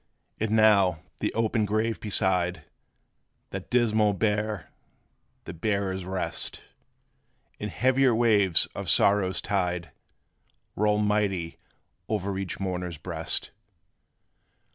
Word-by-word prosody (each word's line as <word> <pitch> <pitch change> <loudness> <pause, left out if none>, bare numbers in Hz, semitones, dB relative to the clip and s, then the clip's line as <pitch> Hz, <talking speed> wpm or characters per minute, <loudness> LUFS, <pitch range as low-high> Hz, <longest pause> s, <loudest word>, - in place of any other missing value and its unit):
And 110 0 -1
now, 100 -6 +4 0.2
the - - -1
open 110 0 +1
grave 110 +2 0
beside, 90 -5 0 0.9
That - - -6
dismal 110 -4 +3
bier 105 0 -1 0.7
the - - -7
bearers 95 0 -2
rest; 95 0 -3 1.0
And 105 - -4
heavier 130 +1 +3
waves 105 -7 +4
of - - -4
sorrow's 100 -2 +3
tide 90 -3 -1 0.8
Roll 105 0 +2
mighty 105 -5 0 0.5
o'er 100 -2 -2
each 95 -2 -4
mourner's 90 -3 -3
breast. 80 0 -3
100 Hz, 100 wpm, -27 LUFS, 90-110 Hz, 1.0 s, now